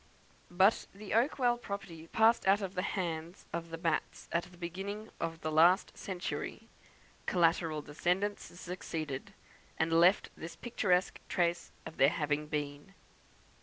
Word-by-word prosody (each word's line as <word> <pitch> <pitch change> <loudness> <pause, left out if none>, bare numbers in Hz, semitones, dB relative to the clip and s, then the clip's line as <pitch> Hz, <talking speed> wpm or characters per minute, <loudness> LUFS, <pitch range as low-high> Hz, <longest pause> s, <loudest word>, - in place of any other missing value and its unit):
But 190 +4 +4
the 205 0 -6
Oakwell 240 0 +3
property 170 -6 -6
passed 225 +3 +4
out 200 +1 +5
of 190 -1 -4
the 180 - -1
hands 170 -3 -3
of 170 0 -3
the 165 - -5
Batts 165 -2 -1
at 170 - +1
the 180 0 -16
beginning 195 +5 -5
of 165 -1 -3
the 155 - -2
last 170 +5 +5
century; 185 -2 -4 0.6
collateral 165 -3 +2
descendants 180 +8 -1
succeeded, 160 -6 -5 0.4
and 160 +1 +1
left 175 +4 +5
this 165 +1 -8
picturesque 190 -6 +1
trace 175 -1 0
of 160 - -8
their 135 - +6
having 150 -2 -1
been. 145 +4 -4
175 Hz, 135 wpm, -33 LUFS, 160-195 Hz, 0.6 s, their